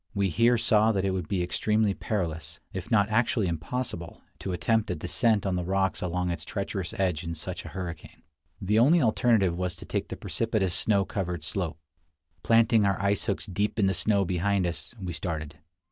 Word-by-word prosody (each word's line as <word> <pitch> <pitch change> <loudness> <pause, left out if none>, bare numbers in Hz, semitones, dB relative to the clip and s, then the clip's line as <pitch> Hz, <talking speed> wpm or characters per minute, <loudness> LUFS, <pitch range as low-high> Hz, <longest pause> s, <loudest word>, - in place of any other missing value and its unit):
We 100 -1 +1
here 115 +7 +3
saw 110 0 +4
that 95 -1 0
it 95 - +1
would 95 -4 -3
be 95 -3 0
extremely 105 +3 +1
perilous, 85 -7 -3
if 95 -1 -5
not 105 -4 +4
actually 110 -1 +2
impossible, 85 +2 -4 0.2
to 95 - -4
attempt 110 +5 +1
a - - -1
descent 115 -5 +2
on 95 -2 0
the 90 - -1
rocks 95 +1 0
along 90 0 -1
its 85 - -4
treacherous 95 -3 -4
edge 90 -4 0
in 85 -1 -4
such 90 +3 -6
a - - -6
hurricane. 90 -4 -7 0.4
The 105 +2 +2
only 150 +9 +6
alternative 110 - +3
was 90 0 -2
to - - -11
take - - -2
the - - -6
precipitous 110 -6 -1
snow 100 +1 +2
covered 90 -5 -3
slope. 85 -2 -3 0.6
Planting 115 +1 +4
our 100 -1 +1
ice 100 +1 +1
hooks 100 - -1
deep 100 +2 -2
in 105 - +3
the 95 - +2
snow 100 +2 +2
behind 95 +2 +1
us, 85 +7 -4
we 90 -3 -4
started. 80 -3 -5
95 Hz, 190 wpm, -27 LUFS, 90-110 Hz, 0.6 s, only